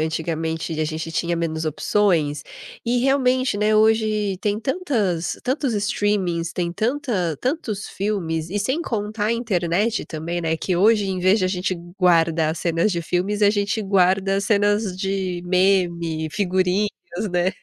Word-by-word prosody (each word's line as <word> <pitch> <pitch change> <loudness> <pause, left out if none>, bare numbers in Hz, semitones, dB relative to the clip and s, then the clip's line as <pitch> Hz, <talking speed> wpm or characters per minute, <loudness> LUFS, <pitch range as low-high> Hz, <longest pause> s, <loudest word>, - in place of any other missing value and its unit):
antigamente 160 0 -2
a 155 - +2
gente 160 +1 -4
tinha 170 0 -1
menos 160 -1 -2
opções, 155 -3 +1 0.4
e, 240 +1 +1
realmente, 255 -2 +2
né, 210 +1 +2
hoje 215 -2 +2
tem 205 0 0
tantas 225 - -1
tantos 260 -2 0
streamings, 200 -5 0
tem 170 -1 -2
tanta 215 - -1
tantos 245 -7 -2
filmes, 170 -6 -2
e 205 - -1
sem 260 +10 0
contar 210 -3 -2
a 230 - +2
internet 210 -1 0
também, 170 +2 -4
né, 160 -1 0
que 180 +1 -1
hoje, 210 +2 +4
em 185 -1 -2
vez 190 +4 +4
de 185 - 0
a 185 - +1
gente 185 0 -1 0.2
guardar 165 -3 +3
cenas 170 +5 +1
de 170 - -1
filmes, 195 +5 -1
a 205 - +6
gente 205 +2 0
guarda 195 0 +2
cenas 205 -1 +1
de 190 -2 -2
meme, 175 -4 +1
figurinhas, 190 +1 +1 0.4
né. 180 +2 +1
190 Hz, 150 wpm, -22 LUFS, 170-210 Hz, 0.4 s, a